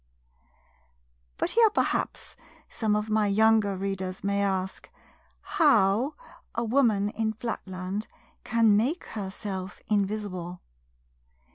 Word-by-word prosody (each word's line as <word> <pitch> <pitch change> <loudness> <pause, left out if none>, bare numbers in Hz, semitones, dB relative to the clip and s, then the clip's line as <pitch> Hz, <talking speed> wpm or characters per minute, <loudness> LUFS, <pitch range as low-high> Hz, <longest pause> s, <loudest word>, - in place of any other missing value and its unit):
But - - 0
here, 460 -1 +5
perhaps, 420 - -1 0.3
some 215 -2 0
of 210 +1 -1
my 215 -1 +2
younger 215 -1 +3
Readers 190 -1 -4
may 200 0 +1
ask 190 -1 -2 0.5
HOW 280 - +3 0.4
a 235 - 0
woman 225 -4 +2
in 220 0 -1
Flatland 195 -3 -4 0.4
can 225 -2 +4
make 260 - +1
herself 195 -2 -6
invisible. 195 -4 -1
210 Hz, 100 wpm, -27 LUFS, 195-225 Hz, 0.5 s, here